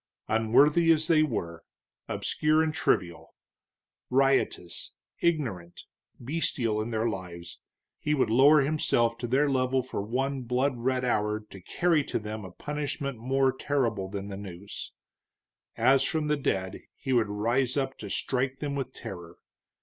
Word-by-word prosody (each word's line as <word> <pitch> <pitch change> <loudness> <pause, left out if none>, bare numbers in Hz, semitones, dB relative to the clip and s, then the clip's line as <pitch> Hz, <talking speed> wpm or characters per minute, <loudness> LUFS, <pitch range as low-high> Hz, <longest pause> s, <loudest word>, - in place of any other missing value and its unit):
Unworthy 145 +10 +4
as 160 -1 +3
they 160 -3 +5
were, 85 - -2 0.5
obscure 155 +1 +1
and 155 -1 -1
trivial; 85 - -1 0.7
riotous, 135 -9 +1 0.3
ignorant, 115 - -1 0.4
bestial 120 -5 0
in 110 - -4
their 110 0 0
lives, 90 -5 -6 0.4
he 150 0 0
would 130 -5 +1
lower 140 +5 +6
himself 135 -5 +1
to 120 - -3
their 135 +5 +3
level 130 -1 +1
for 125 -5 -4
one 130 +6 -2
blood 125 +3 0
red 130 +1 0
hour 105 -3 +1
to 105 -3 -13
carry 165 - +1
to - - -2
them 110 0 -5
a 95 - -8
punishment 145 - -4
more 135 +2 +2
terrible 115 -9 -1
than 100 0 -5
the 100 -1 -6
noose. 100 0 -8 0.9
As 130 +3 +4
from 155 +2 0
the 150 0 +2
dead 95 -8 -2
he 135 -2 -3
would 115 -4 +2
rise 120 +6 0
up 135 -1 -1
to 105 - -7
strike 130 +5 -1
them 145 -1 -3
with 135 -2 -4
terror. 85 -2 -9
125 Hz, 150 wpm, -28 LUFS, 105-140 Hz, 0.9 s, lower